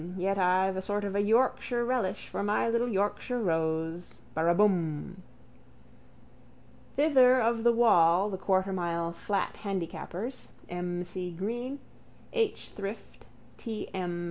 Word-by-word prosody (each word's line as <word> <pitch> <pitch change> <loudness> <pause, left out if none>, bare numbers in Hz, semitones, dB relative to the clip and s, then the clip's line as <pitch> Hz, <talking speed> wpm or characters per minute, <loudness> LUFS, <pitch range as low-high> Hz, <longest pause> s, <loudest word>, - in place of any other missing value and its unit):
Yet 195 +2 0
I've 185 +1 +2
a - - -1
sort 205 +2 -2
of 200 -1 -3
a 200 - +2
Yorkshire 240 +2 +2
relish 230 -6 -1
for - - -4
My 205 +3 +1
little 235 +1 +1
Yorkshire 205 +4 -1
rose. 165 -2 -1 0.2
Baraabum. 170 0 +1 1.8
Thither 260 -4 +5
of 230 -1 +1
the 235 - +6
wall 195 -4 +4
the 190 - -3
quartermile 180 -3 0
flat 195 +3 -2
handicappers, 195 +4 -4 0.2
M. 175 0 -3
C. 180 0 -5
Green, 235 +10 -4 0.6
H. 450 -3 -1
Shrift, 200 +2 -7 0.3
T. 225 -3 -5
M. 175 -2 -3
195 Hz, 120 wpm, -29 LUFS, 175-230 Hz, 1.8 s, the